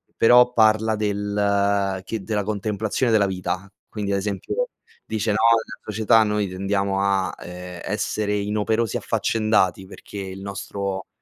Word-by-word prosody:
però 125 +1 +6
parla 110 -1 +4
del 100 -2 0
che 110 -1 -4
della 105 +1 -1
contemplazione 110 +3 -1
della 105 -2 +4
vita. 95 0 -3 0.2
Quindi 105 -2 -3
ad 100 - +1
esempio, 105 - -2 0.4
dice: 110 0 -1
"No, 105 - +1 0.2
nella 110 -1 -2
società 110 +1 +3
noi 105 -1 0
tendiamo 100 +1 -1
a, 95 -1 +1
ehm, 90 0 -8
essere 105 0 -1
inoperosi 105 +2 0
e - - -4
affaccendati 110 -4 +1
perché 100 +1 -10
il 95 0 -6
nostro 100 -1 -4
105 Hz, 140 wpm, -23 LUFS, 100-110 Hz, 0.4 s, però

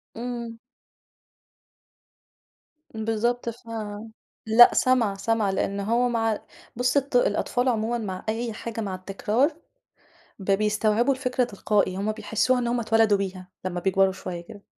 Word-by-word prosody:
امم. 235 -1 -5 2.4
بالضبط 225 +2 -1
ف 235 +1 -11 0.8
لأ، 225 +2 +8
سَمع 245 -6 +2
سَمع 220 +1 0
لأنه 200 +1 -1
هو 245 +1 +3
مع 225 -2 0 0.4
بص 250 +3 +1
الط 275 -1 -1
الأطفال 245 +1 +1
عمومًا 230 +1 0
مع 190 -5 -5
أي 225 +1 -2
حاجة 230 +1 -5
مع 195 -3 -3
التكرار، 210 - 0 0.8
ب 195 0 -1
بيستوعبوا 215 +5 +2
الفكرة 255 -1 0
تلقائي، 205 -4 0
هم 205 +2 -1
بيحسوها 220 +3 0
إن 240 - -1
هم 240 0 0
اتولدوا 225 -2 +3
بيها 185 -2 -5 0.2
لما 180 -1 -2
بيكبروا 190 +1 +3
شوية 185 -2 -6
كده، 200 +3 -13
225 Hz, 130 wpm, -25 LUFS, 200-240 Hz, 2.4 s, لأ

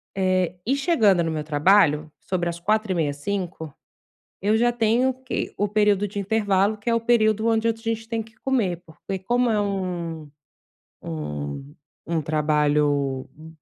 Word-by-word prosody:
Eh, 185 -2 +1
e 265 +5 +2
chegando 225 - +3
no 165 - -1
meu 155 -1 -3
trabalho, 155 0 +3
sobre 175 -2 -2
as 170 0 -5
16h30, 185 -6 0
17h, 170 -1 -4 0.7
eu 210 +3 +2
já 240 +1 +3
tenho 240 +3 +2
que 260 0 -4
o 205 0 0
período 205 -1 +2
de 205 +1 -6
intervalo, 205 0 +1
que 205 - -6
é - - +3
o 230 - +1
período 220 -2 +2
onde 225 0 +2
a - - +3
gente 225 0 -4
tem 230 -1 -2
que 220 +1 -18
comer, 215 -9 -1
porque 180 +4 -7
como 245 +4 +1
é 215 -2 +2
um 175 -6 -3 0.7
um 75 - -6 0.3
um 165 -1 0
trabalho, 150 -3 +1
hu 155 +1 -14
195 Hz, 160 wpm, -24 LUFS, 155-220 Hz, 0.7 s, chegando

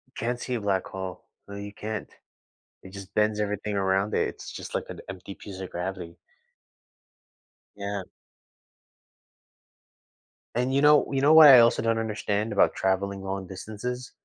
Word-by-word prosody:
Can't 120 +2 -2
see 125 - -4
a 115 - -3
black 100 -2 0
hole. 95 -1 -7 0.2
No, 100 - -8
you 100 0 -7
can't. 110 0 -5 0.7
It 95 - -12
just 100 -1 -10
bends 105 0 +1
everything 105 0 -2
around 95 +1 +1
it. - - +1
It's - - -9
just - - -8
like - - -1
an - - -8
empty 95 +1 -8
piece 95 -1 -10
of 95 - -6
gravity. 90 -1 -5 1.6
Yeah. 100 -1 -4 2.5
And 125 +2 0
you 140 - +3
know 150 0 +6
you 135 -1 0
know 145 +3 +5
what 160 -1 +10
I 130 -2 +10
also 115 0 +4
don't 115 0 +1
understand 105 -1 -2
about 100 - +3
traveling 95 +1 -1
long 95 -1 -4
distances? 110 +6 -6
100 Hz, 155 wpm, -26 LUFS, 95-115 Hz, 2.5 s, what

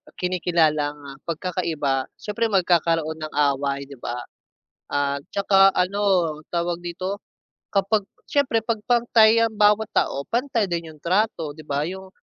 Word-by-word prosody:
kinikilalang, 160 -5 +1
ah, 135 -1 -10
pagkakaiba, 160 -6 -1
siyempre 215 +2 -2
magkakaroon 165 -5 +1
ng 155 0 -6 0.2
away, 140 0 -2
'di 140 -2 -12
ba? 120 0 -5 0.6
At 140 0 -1
saka, 195 -1 +5
ano, 185 -4 +1 0.2
tawag 170 0 0
dito, 185 +3 -4 0.5
kapag 200 +2 +2 0.2
siyempre 240 -6 +1
'pag 225 -3 -1
pantay 230 -2 +5
ang 220 - -3
bawat 210 +1 +3
tao 140 +1 0
pantay 235 -3 0
din 170 -3 -3
'yong 155 -2 -15
trato, 175 -4 0
'di 155 - -12
ba. 145 +1 -1
'Yong 190 +2 -7
175 Hz, 135 wpm, -23 LUFS, 150-205 Hz, 0.6 s, saka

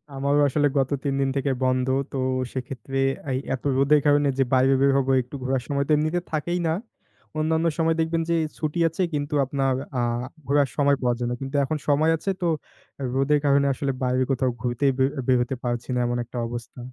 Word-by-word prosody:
আমারও 140 +2 +2
আসলে 145 +1 +2
গত 135 0 +1
৩ 140 -1 0
দিন 135 - +1
থেকে 140 0 0
বন্ধ। 130 0 +1 0.2
তো 135 - -4 0.4
সেক্ষেত্রে 135 +1 -5 0.3
এই 130 - 0
এতো 130 +2 -3
রোদের 145 +2 +4
কারণে 145 0 +4
যে, - - +6
বাইরে 130 +1 +4
বের 140 0 +5
হবো, 135 -1 +1
একটু 125 +4 -10
ঘোরার 130 -1 0
সময় 140 -1 0
তো - - -1
এমনিতে 155 +4 +1
থাকেই 175 +3 -1
না। 160 - +2 0.7
অন্যান্য 160 +1 +1
সময় 165 0 +2
দেখবেন 165 +1 0
যে 170 - +3 0.2
ছুটি 155 +2 -2
আছে 165 +3 -3
কিন্তু, 145 +1 -2
আপনার 135 0 0 0.3
আ - - +1 0.5
ঘোরার 140 -1 +3
সময় 140 -1 +3
পাওয়া 125 -1 +1
যায় 120 - -1
না। 120 - -1
কিন্তু 135 +2 -5
এখন 155 +3 -1
সময় 155 +3 +4
আছে 180 - -4
তো, 175 - +1 0.7
রোদের 140 +2 +3
কারণে 140 0 +4
আসলে 135 +1 -2
বাইরে 130 0 +2
কোথাও 130 -1 +1
ঘুরতেই 130 +3 +1
বের 130 - +4 0.2
বের 130 - +4
হতে 130 +2 -2
পারছি 120 -1 -3
না। 125 - +1
এমন 120 0 -1
একটা 120 +1 -9
অবস্থা। 120 +1 -7
140 Hz, 200 wpm, -24 LUFS, 130-150 Hz, 0.7 s, যে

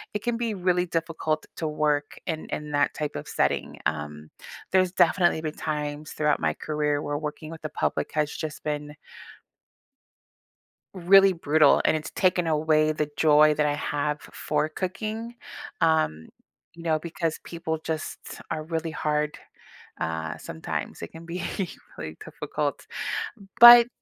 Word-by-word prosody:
it 210 - -2
can 240 -1 0
be 235 -2 -1
really 180 -1 +1
difficult 165 -2 -2
to 160 - -2
work 150 -1 0
in 160 -2 -3
in 150 0 -5
that 145 -1 +2
type 150 -1 -3
of 75 - -6
setting, - - 0
um, 75 0 -3 0.4
there's 185 -1 +3
definitely 175 -4 +3
been 155 -1 -3
times 150 0 -4
throughout 150 -1 +1
my - - +1
career 150 -1 -1
where 145 0 -2
working 155 +1 -6
with 165 - -9
the 155 - -4
public - - -1
has 150 -1 0
just 155 -1 -6
been 150 0 -4 2.0
really 195 +2 +6
brutal, 155 -3 +4
and - - +3
it's 155 - -6
taken 180 -2 +2
away 155 0 +3
the 150 -1 -2
joy 150 0 +6
that 150 0 +1
I 145 - +1
have 150 0 -1
f - - -14
for 150 0 -1
cooking, 215 +7 -4 0.5
um, 155 - +2 0.5
you 170 0 -11
know, 160 -2 +1
because 165 0 -3
people 165 -2 -4
just 160 0 -5
are 155 - -3
really 160 0 -3
hard, 150 -1 -1 0.6
uh, 80 0 -3
sometimes, 80 - -5
it - - -4
can 165 +1 -11
be 175 +1 -4 0.6
really - - -6
difficult. - - -4 0.7
But 240 0 +12
155 Hz, 150 wpm, -26 LUFS, 150-170 Hz, 2.0 s, But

